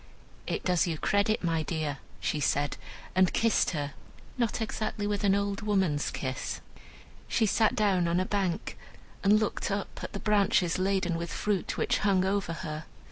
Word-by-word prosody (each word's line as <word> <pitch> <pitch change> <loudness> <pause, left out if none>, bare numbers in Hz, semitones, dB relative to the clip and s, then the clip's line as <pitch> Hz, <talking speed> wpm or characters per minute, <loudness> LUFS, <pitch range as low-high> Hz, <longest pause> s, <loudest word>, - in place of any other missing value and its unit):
"It - - -2
does 180 0 +2
you 165 -2 -1
credit, 205 +5 +1
my 165 -2 +1
dear," 155 -2 -2 0.2
she 150 - -1
said, 145 0 +1 0.4
and 185 -1 +4
kissed 225 -2 +3
her, 145 -4 -3 0.4
not 235 -3 0
exactly 215 -1 -2
with 205 -1 -1
an 195 -1 +4
old 200 0 -1
woman's 190 -8 +1
kiss. 130 -1 -3 0.7
She 225 - +2
sat 220 +3 +3
down 195 -6 +2
on 170 +1 +2
a 185 - +1
bank, 195 -4 -2 0.4
and 205 +2 +6
looked 215 - -1
up 200 0 -3
at - - -6
the 200 - -3
branches 195 -5 +2
laden 185 -3 +1
with 170 0 -4
fruit 205 -3 -1
which - - +1
hung 195 -3 +3
over 195 -3 0
her. 155 0 -5
190 Hz, 170 wpm, -29 LUFS, 165-205 Hz, 0.7 s, and